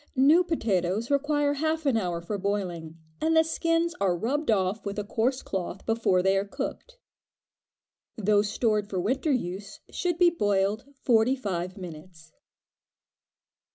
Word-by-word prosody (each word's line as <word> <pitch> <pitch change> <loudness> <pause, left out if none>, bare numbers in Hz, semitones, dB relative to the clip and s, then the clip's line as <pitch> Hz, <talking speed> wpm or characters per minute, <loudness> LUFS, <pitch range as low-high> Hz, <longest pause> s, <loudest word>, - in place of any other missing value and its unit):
New 295 +7 +5
potatoes 220 - -1
require 290 0 +2
half 315 +2 -1
an 275 -4 +3
hour 175 -6 -1
for 200 +4 -4
boiling, 180 -5 -3 0.2
and 320 +1 +2
the 320 - +7
skins 330 +1 0
are 185 -3 +2
rubbed 275 - -1
off 195 0 +1
with 200 0 -5
a 210 - -1
coarse 240 +5 -1
cloth 190 0 -4
before 225 -5 +2
they 190 +1 +3
are 195 - +2
cooked. - - -6 1.2
Those 205 -1 +2
stored 210 -1 0
for 190 - -2
winter 260 - 0
use 195 -5 -3
should 350 -2 -1
be 350 -1 +5
boiled 205 - 0
forty 245 -1 +3
five 185 -6 -4
minutes. 165 -2 -11
215 Hz, 145 wpm, -27 LUFS, 190-280 Hz, 1.2 s, the